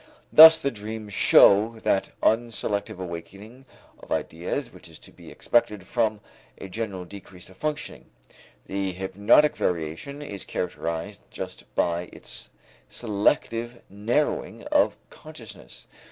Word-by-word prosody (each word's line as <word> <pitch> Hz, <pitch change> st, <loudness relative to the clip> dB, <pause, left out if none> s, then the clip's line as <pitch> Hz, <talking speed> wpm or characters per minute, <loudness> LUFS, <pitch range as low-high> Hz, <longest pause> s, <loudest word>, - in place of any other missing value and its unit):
Thus 160 Hz, +1 st, +11 dB
the 140 Hz, -3 st, -2 dB
dreams 110 Hz, -1 st, -7 dB
show 110 Hz, +5 st, +5 dB
that 95 Hz, -, +1 dB
unselective 110 Hz, -3 st, 0 dB
awakening 100 Hz, +8 st, -9 dB, 0.3 s
of -, -, -16 dB
ideas 90 Hz, -, -3 dB
which 90 Hz, -2 st, -14 dB
is 80 Hz, -, -13 dB
to -, -, -15 dB
be -, -, -14 dB
expected 105 Hz, -5 st, 0 dB
from 110 Hz, -1 st, -1 dB, 0.4 s
a 95 Hz, -, -9 dB
general 95 Hz, -3 st, -5 dB
decrease 95 Hz, -1 st, -12 dB
of 95 Hz, -, -19 dB
functioning. 150 Hz, -1 st, -4 dB, 0.6 s
The 95 Hz, -1 st, -3 dB
hypnotic 100 Hz, +10 st, +3 dB
variation 85 Hz, -, -3 dB
is 100 Hz, -9 st, -6 dB
characterized 90 Hz, +3 st, -4 dB
just 95 Hz, -1 st, -9 dB
by 85 Hz, +1 st, 0 dB
its -, -, -10 dB, 0.4 s
selective 115 Hz, +2 st, -1 dB
narrowing 115 Hz, +9 st, -1 dB
of -, -, +3 dB, 0.2 s
consciousness. -, -, -13 dB
100 Hz, 120 wpm, -25 LUFS, 90-115 Hz, 0.6 s, Thus